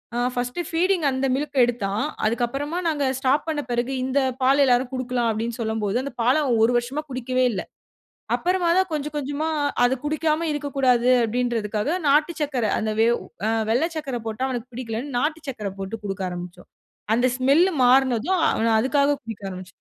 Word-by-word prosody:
அ, - - -1 0.2
first 245 +7 -2
feeding 345 -1 +1
அந்த 260 +1 -1
மில்க்க 285 0 -4
எடுத்தான். 215 -2 -2 0.2
அதுக்கப்பறமா 265 +8 -1
நாங்க 295 -3 -1 0.2
ஸ்டாப் 270 +4 +1
பண்ண 310 -2 -1
பிறகு 240 +2 -1
இந்த 265 +2 +1 0.2
பால் 275 +2 +5
எல்லாரும் 250 0 +2
குடுக்கலாம் 250 -2 -1
அப்டின்னு 225 +2 -3
சொல்லும்போது, 220 -1 -1
அந்த 280 - -5
பால 250 +3 +4
அவன் 240 -5 +1
1 235 - +2
வருஷமா 260 +5 -3
குடிக்கவே 255 0 0
இல்ல. 195 - -3 0.8
அப்பறமா 360 -1 0
தான் 375 -1 +1
கொஞ்சம் 300 0 -3
கொஞ்சமா 290 +2 -2 0.4
அது 245 +2 +3
குடிக்காம 310 +2 0
இருக்கக்கூடாது 270 -4 +1 0.2
அப்டின்றதுக்காக 230 - -1
நாட்டு 300 +4 +3
சர்க்கர 275 -6 0
அந்த 215 0 -1
வெவ் 235 +1 +3 0.3
அ - - +2 0.2
வெள்ள 245 +8 +2
சக்கர 275 -6 -3
போட்டா 225 +4 -2
அவனுக்கு 250 -1 -5
பிடிக்கலனு, 240 +1 -4
நாட்டு 310 +4 -1
சக்கர 215 -6 -4
போட்டு 195 +3 -5
குடுக்க 195 -1 -4
ஆரம்பிச்சோம். 180 0 -8 0.4
அந்த 245 +2 +3
ஸ்மெல்லு 290 +9 +4
மாறுனதும் 260 +6 +3
அவன் 225 0 +2
அதுக்காக 280 +2 +2
குடிக்க 225 -3 -8
ஆரம்பிச்சான். 185 0 -9
255 Hz, 165 wpm, -23 LUFS, 230-290 Hz, 0.8 s, பால்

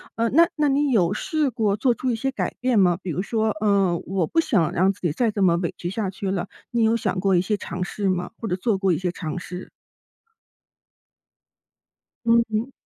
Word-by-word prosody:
呃， 230 0 +1
那 330 +5 +6
那 300 -1 +2
你 285 0 +2
有 190 -6 +3
试 300 +5 0
过 215 -4 0
做 245 +2 +2
出 255 +1 -1
一 - - 0
些 270 +4 -1
改 - - -3
变 250 -3 +1
吗？ 180 -3 +4
比 185 - -6
如 175 +3 -1
说， 220 +1 0
呃 195 -4 +2
我 185 -3 -1
不 330 - +2
想 185 - +1
让 190 +3 +3
自 200 - -12
己 175 -5 0
再 235 +6 +1
这 205 - -3
么 170 -2 +4
委 170 -1 -2
屈 175 - -4
下 195 0 -2
去 190 0 -4
了， 180 -3 -2 0.2
你 235 -1 +1
有 225 +1 +3
想 195 - -2
过 195 0 +2
一 175 - +4
些 210 +3 0
尝 180 -1 -5
试 195 +2 -2
吗？ 180 -1 -2
或 225 - -5
者 180 - 0
做 195 +2 0
过 195 -1 +1
一 - - 0
些 180 +1 -2
尝 165 0 -5
试。 180 +1 -8 2.6
嗯。 230 +1 +2
200 Hz, 235 characters per minute, -23 LUFS, 180-230 Hz, 2.6 s, 那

